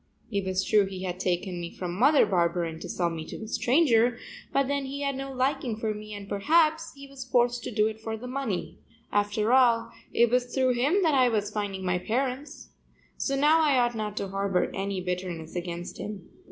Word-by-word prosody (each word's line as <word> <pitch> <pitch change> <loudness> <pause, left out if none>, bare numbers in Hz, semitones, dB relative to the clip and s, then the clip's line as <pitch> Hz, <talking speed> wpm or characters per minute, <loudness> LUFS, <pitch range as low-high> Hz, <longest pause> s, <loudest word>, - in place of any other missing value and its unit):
It 200 -2 -1
was 190 0 0
true 205 0 +3
he 190 -1 -6
had 180 -1 -4
taken 180 0 -1
me 170 - -5
from 175 -1 -5
Mother 275 - +5
Barberin 170 -2 0
to - - -8
sell 175 -2 0
me 160 -1 -5
to - - -7
a - - -7
stranger, 240 -2 +3 0.3
but 275 -1 +2
then 280 0 -1
he 280 +2 -5
had 280 -1 -1
no 270 0 -5
liking 260 -2 -1
for 220 -1 -1
me 215 0 -9
and 200 -1 -8
perhaps 315 +10 +2
he 280 0 -11
was 275 -1 -8
forced 245 -1 +1
to - - -4
do 215 -1 +2
it 220 0 -3
for 225 0 -4
the 235 - -9
money. 270 +2 -3 0.3
After 205 +3 +1
all 240 -3 +4 0.2
it 235 -1 +3
was 250 0 +3
through 255 +1 +1
him 290 +11 +2
that 320 -3 +3
I 255 -2 +5
was 210 -2 -1
finding 200 -3 -3
my 180 0 +1
parents. 265 +7 -3 0.5
So 275 - -1
now 300 +4 +4
I 290 -4 +3
ought 240 -1 +2
not 215 -2 -4
to 200 - -2
harbor 195 -1 0
any 195 -1 -2
bitterness 180 -3 -4
against 175 0 -5
him. 205 -4 -6
220 Hz, 210 wpm, -27 LUFS, 190-265 Hz, 0.5 s, Mother